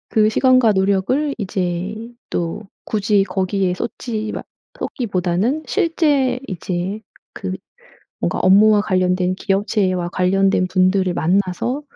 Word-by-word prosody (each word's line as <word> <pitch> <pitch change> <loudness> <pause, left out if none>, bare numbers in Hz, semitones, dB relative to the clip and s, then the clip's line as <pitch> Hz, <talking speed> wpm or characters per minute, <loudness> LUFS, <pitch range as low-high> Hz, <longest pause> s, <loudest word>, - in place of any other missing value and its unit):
그 215 -1 +3
시간과 255 -1 +4
노력을 200 +10 +1
이제 185 -1 -2 0.4
또 175 +5 -3 0.2
굳이 205 -2 +1
거기에 190 0 -1
쏟지 220 0 -4
마 - - -5 0.4
쏟기보다는 200 - -1
실제 300 -9 +1
이제 185 +3 -3 0.3
그 - - -5 0.7
뭔가 - - -1
업무와 205 +3 +5
관련된 185 -2 +1
기업체와 195 -3 0
관련된 185 +1 +2
분들을 185 0 +2
만나서 195 - 0
195 Hz, 245 characters per minute, -19 LUFS, 185-220 Hz, 0.7 s, 업무와